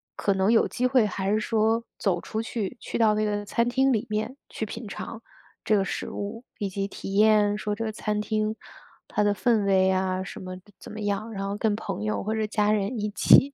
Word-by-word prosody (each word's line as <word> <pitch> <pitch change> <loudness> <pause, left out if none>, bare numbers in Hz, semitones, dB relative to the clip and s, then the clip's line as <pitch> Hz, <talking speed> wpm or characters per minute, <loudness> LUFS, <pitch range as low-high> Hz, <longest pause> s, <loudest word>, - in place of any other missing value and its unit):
可 200 - +1
能 190 +3 +2
有 225 - +4
机 250 +1 0
会 250 -3 +4
还 195 -1 -1
是 215 - +3
说 225 +1 +1 0.2
走 185 -4 +1
出 220 +5 -3
去， 225 0 -4
去 - - -4
到 220 -2 +4
那 215 0 +1
个 205 0 -1
餐 235 +3 +1
厅 265 +1 +3
里 230 +2 -1
面 215 +5 -2
去 220 - -3
品 225 +1 -7
尝 225 +3 -7 0.4
这 215 - +3
个 195 - +1
食 - - -3
物， 220 +4 -5
以 200 - -2
及 195 +1 -2
体 195 0 -7
验 210 0 +5
说 210 -1 -2
这 225 +2 -3
个 220 - -2
餐 210 -1 -2
厅 215 0 -1 0.5
它 210 - 0
的 205 0 +2
氛 220 -2 +2
围 190 -1 +4
啊 185 0 0
什 - - -8
么 185 0 -6 0.2
怎 - - -10
么 215 0 -6
样， 205 +2 -2
然 195 -1 -3
后 200 - -2
跟 210 0 +1
朋 155 - -4
友 105 -1 -1
或 215 - -1
者 220 -1 0
家 210 -1 +2
人 215 +3 0
一 210 0 -2
起， 275 +6 +6
210 Hz, 250 characters per minute, -26 LUFS, 200-225 Hz, 0.5 s, 起